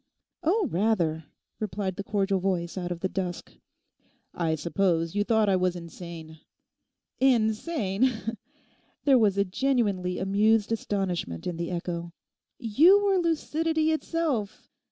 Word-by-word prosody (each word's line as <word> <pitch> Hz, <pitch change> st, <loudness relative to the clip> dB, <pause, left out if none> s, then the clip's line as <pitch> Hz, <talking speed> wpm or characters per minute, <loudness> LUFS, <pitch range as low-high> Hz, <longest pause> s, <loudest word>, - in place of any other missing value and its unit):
'Oh, 385 Hz, +4 st, +2 dB
rather,' 170 Hz, -5 st, +1 dB, 0.3 s
replied 195 Hz, -2 st, -3 dB
the 200 Hz, -, -5 dB
cordial 195 Hz, -1 st, 0 dB
voice 180 Hz, -2 st, -1 dB
out 180 Hz, -2 st, -4 dB
of 170 Hz, -1 st, -5 dB
the 190 Hz, -, +1 dB
dusk. 185 Hz, -2 st, -4 dB, 0.8 s
'I 165 Hz, -2 st, 0 dB
suppose 165 Hz, 0 st, 0 dB
you 205 Hz, 0 st, +1 dB
thought 220 Hz, -1 st, +2 dB
I 195 Hz, -, +3 dB
was 180 Hz, -1 st, +1 dB
insane?' 170 Hz, -2 st, -9 dB, 0.8 s
'Insane!' 235 Hz, -, +2 dB, 0.9 s
There 270 Hz, -3 st, +6 dB
was 205 Hz, -3 st, +3 dB
a 200 Hz, -, +3 dB
genuinely 200 Hz, -5 st, 0 dB
amused 210 Hz, +3 st, +2 dB
astonishment 185 Hz, -, -2 dB
in 175 Hz, -, -3 dB
the 170 Hz, 0 st, -3 dB
echo. 170 Hz, -1 st, -4 dB, 0.4 s
'You 330 Hz, -, +5 dB
were 390 Hz, -2 st, +3 dB
lucidity 320 Hz, -1 st, 0 dB
itself. 310 Hz, -10 st, -2 dB
195 Hz, 125 wpm, -27 LUFS, 175-240 Hz, 0.9 s, There